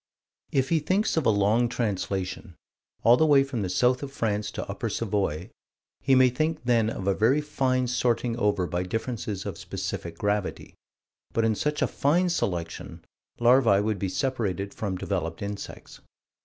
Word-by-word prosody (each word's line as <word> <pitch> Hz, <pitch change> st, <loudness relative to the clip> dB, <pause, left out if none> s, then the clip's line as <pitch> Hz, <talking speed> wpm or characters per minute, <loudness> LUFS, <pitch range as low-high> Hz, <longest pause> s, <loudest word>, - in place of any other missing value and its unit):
If 135 Hz, -1 st, +1 dB
he 165 Hz, -, +3 dB
thinks 190 Hz, +8 st, +1 dB
of 160 Hz, -4 st, +1 dB
a -, -, +6 dB
long 110 Hz, +3 st, +3 dB
translation 100 Hz, -5 st, -3 dB, 0.5 s
all 120 Hz, +2 st, +7 dB
the 160 Hz, -, +4 dB
way 140 Hz, -2 st, +6 dB
from 135 Hz, -5 st, -4 dB
the 95 Hz, -, -2 dB
south 125 Hz, +7 st, +2 dB
of 140 Hz, -1 st, -6 dB
France 105 Hz, -5 st, -1 dB
to -, -, -5 dB
Upper 105 Hz, +4 st, -3 dB
Savoy, 95 Hz, -7 st, -2 dB, 0.5 s
he 135 Hz, -, +3 dB
may 130 Hz, -1 st, +5 dB
think 155 Hz, +3 st, -1 dB
then 115 Hz, -3 st, +2 dB
of 95 Hz, -, -5 dB
a 100 Hz, -, +3 dB
very 115 Hz, +9 st, +3 dB
fine 130 Hz, -4 st, 0 dB
sorting 120 Hz, -1 st, 0 dB
over 105 Hz, -4 st, +1 dB
by 85 Hz, +1 st, -2 dB
differences 105 Hz, 0 st, -3 dB
of -, -, -5 dB
specific 85 Hz, -1 st, -5 dB
gravity 105 Hz, 0 st, -2 dB, 0.6 s
but 115 Hz, -, +2 dB
in 110 Hz, -, +3 dB
such 150 Hz, +7 st, -1 dB
a -, -, +2 dB
fine 175 Hz, +6 st, +2 dB
selection, 85 Hz, -, -3 dB, 0.3 s
larvae 120 Hz, -4 st, +5 dB
would 105 Hz, -1 st, -1 dB
be 95 Hz, -, -1 dB
separated 100 Hz, -5 st, -2 dB
from 100 Hz, -4 st, -3 dB
developed 85 Hz, -3 st, -3 dB
insects. 100 Hz, 0 st, -7 dB
115 Hz, 170 wpm, -26 LUFS, 100-130 Hz, 0.6 s, all